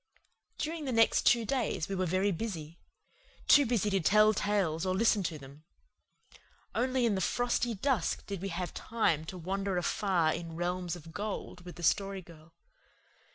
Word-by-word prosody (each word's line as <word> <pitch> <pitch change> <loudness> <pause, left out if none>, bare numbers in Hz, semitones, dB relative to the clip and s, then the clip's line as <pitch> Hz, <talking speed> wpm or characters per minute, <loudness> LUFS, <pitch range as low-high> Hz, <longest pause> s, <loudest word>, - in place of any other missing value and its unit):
During 315 0 -3
the 260 - -2
next 225 -1 +3
two 235 -2 +4
days 230 -9 -1
we 195 - -4
were 185 -1 0
very 185 +4 +1
busy 170 -5 -5 0.7
too 285 -3 +7
busy 215 -3 +1
to 195 - +2
tell 215 +5 +5
tales 195 -6 0
or 185 -1 0
listen 220 0 +3
to 170 -4 -3
them. 140 +2 -14 1.1
Only 255 +2 +1
in 225 - +2
the 190 - -1
frosty 245 +2 0
dusk 220 -4 0
did 200 -3 -5
we 195 - -3
have 180 0 -4
time 170 -9 0
to 185 +3 -7
wander 190 +2 -2
afar 175 -2 +1
in 165 -1 -6
realms 175 0 -2
of 165 -1 -12
gold 205 -3 -5
with 175 - -9
the 175 - -9
Story 195 +2 +1
Girl. 165 -1 -16
195 Hz, 170 wpm, -31 LUFS, 170-220 Hz, 1.1 s, too